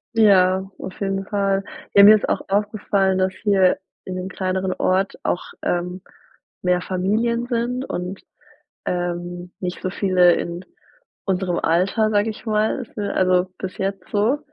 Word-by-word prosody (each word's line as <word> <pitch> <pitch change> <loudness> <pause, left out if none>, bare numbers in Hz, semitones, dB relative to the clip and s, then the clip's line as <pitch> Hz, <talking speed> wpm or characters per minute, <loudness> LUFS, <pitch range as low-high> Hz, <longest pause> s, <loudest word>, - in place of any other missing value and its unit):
Ja, 190 -3 +4
auf 185 - -8
jeden 195 0 -1
Fall. 195 -1 0 0.3
Ja, 200 - +9
mir 210 +2 +10
ist 210 - -1
auch - - 0
aufgefallen, 200 -1 +1
dass 185 0 +1
hier 190 -4 +2 0.3
in 185 - -5
dem 185 0 -4
kleineren 185 0 -2
Ort 190 +1 0
auch, 175 - 0 0.2
ähm, 180 +1 -2 0.6
mehr 180 -1 +2
Familien 225 +7 0
sind 245 +1 -1
und, 180 +2 -5 0.6
ähm, 175 0 -3
nicht 180 -1 -4
so 185 - -2
viele 185 -2 +4
in 175 +2 -4 0.6
unserem 185 -2 0
Alter, 195 +6 +2
sage 205 +1 +2
ich 220 +2 -8
mal, 215 +4 0
fü 205 -2 -3
also, 185 0 +2
bis 190 -1 -6
jetzt 195 -1 -3
so. 220 +8 +2
190 Hz, 150 wpm, -22 LUFS, 180-205 Hz, 0.6 s, mir